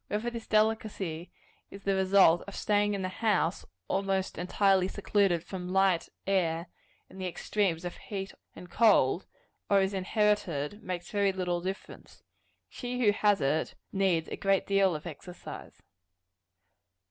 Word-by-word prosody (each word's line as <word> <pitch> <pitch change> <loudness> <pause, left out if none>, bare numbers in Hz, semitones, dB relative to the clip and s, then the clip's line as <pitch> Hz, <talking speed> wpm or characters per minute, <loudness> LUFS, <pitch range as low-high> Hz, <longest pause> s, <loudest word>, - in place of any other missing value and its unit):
Whether 215 +3 -2
this 230 -1 -7
delicacy 215 -6 0 0.4
is 200 0 -11
the 200 - +1
result 190 -3 +5
of 200 - -8
staying 205 0 +1
in 195 - -3
the - - 0
house, 200 -4 0 0.2
almost 195 -2 -1
entirely 190 +1 +2
secluded 195 -4 +1
from 180 -2 -6
light, 190 -3 +2 0.2
air, 170 -4 +1 0.4
and 190 - -11
the 185 - -2
extremes 180 -1 -1
of 175 - -5
heat 195 -2 -6 0.2
and 180 - -10
cold, 180 - +3 0.4
or 200 - +5
is 190 +1 +1
inherited, 195 -3 0
makes 180 -3 -5
very 200 -1 +2
little 180 -2 -2
difference. 190 +2 -7 0.4
She 250 -1 -3
who 205 - +6
has 205 -1 +2
it 145 +4 0 0.2
needs 190 -5 +1
a - - -5
great 195 -1 +1
deal 195 -3 +3
of 150 - -7
exercise. 175 +2 -10
195 Hz, 145 wpm, -29 LUFS, 175-205 Hz, 0.4 s, who